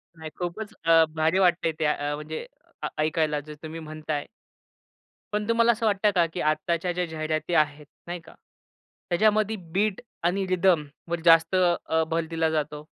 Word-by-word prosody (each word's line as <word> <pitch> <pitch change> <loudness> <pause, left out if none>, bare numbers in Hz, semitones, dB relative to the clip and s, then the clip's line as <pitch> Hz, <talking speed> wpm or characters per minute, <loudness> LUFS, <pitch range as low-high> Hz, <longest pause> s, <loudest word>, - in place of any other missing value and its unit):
नाही, 160 -1 -8
खूपच 195 +5 -5
अ, 165 -1 +6
भारी 160 +4 +2
वाटतंय 175 -3 +3
ते - - -16
त्या 150 -1 +3 0.2
अ, - - -1
म्हणजे 155 +1 -6 0.4
अ - - 0
ऐकायला 155 -1 +1
जे 150 +1 -10
तुम्ही 160 +1 -6
म्हणताय. 155 -2 -4 1.1
पण 210 0 -1
तुम्हाला 230 +1 +5
असं 225 0 -2
वाटतं 205 0 +3
का, 175 -2 +4
की 180 - -3
आत्ताच्या 165 +3 0
ज्या 180 0 -1
जाहिराती 155 0 -3
आहेत 150 -1 +1 0.2
नाही 175 0 -4
का, 165 -1 -16 0.8
त्याच्यामध्ये 215 +4 +2 0.2
बीट 205 +1 +1 0.2
आणि 190 +3 +1
रिदमवर 170 -3 0
जास्त 165 +1 +6
अ, 175 -3 +2
भर 165 0 0
दिला 165 -1 +1
जातो? 150 -1 -2
165 Hz, 160 wpm, -26 LUFS, 155-185 Hz, 1.1 s, अ